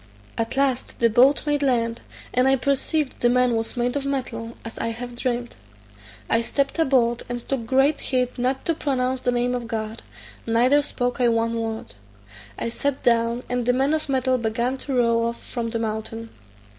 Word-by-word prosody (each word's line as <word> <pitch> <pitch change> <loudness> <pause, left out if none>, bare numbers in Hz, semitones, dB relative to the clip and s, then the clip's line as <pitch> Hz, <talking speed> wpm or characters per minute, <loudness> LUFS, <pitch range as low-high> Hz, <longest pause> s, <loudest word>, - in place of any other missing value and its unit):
At 230 +3 -3
last 270 -2 0
the 230 -1 +4
boat 260 +7 +5
made 295 -1 +1
land, 235 -4 +1 0.3
and 250 +1 +3
I 270 - +5
perceived 280 +2 0
the 240 - +3
man 250 -1 +3
was 225 +2 -3
made 245 +1 0
of 285 - -1
metal, 235 -4 -3
as 225 - -7
I - - -1
had 240 +1 -5
dreamt. 240 -1 -2 0.7
I 230 - +2
stept 280 +6 -1
aboard, 245 -6 +3
and 240 -1 -5
took 250 -5 -2
great 270 +4 +3
heed 250 -1 -1
not 260 +2 0
to 335 - +2
pronounce 260 -4 -1
the 245 - +1
name 245 0 +1
of 245 -2 -3
God, 220 -1 -4 0.5
neither 245 +6 +4
spoke 245 -3 -2
I 245 - +5
one 230 0 +1
word. 225 - -4 0.6
I - - -2
sat 280 +3 -2
down, 235 +1 +2
and 245 0 -1
the 245 - +4
man 270 +4 +2
of 310 -2 -1
metal 260 -1 +2
began 235 +3 0
to 270 0 -4
row 230 -1 +3
off 235 0 -2
from 235 -2 -4
the 230 - -2
mountain. 225 0 -4
245 Hz, 190 wpm, -24 LUFS, 230-265 Hz, 0.7 s, boat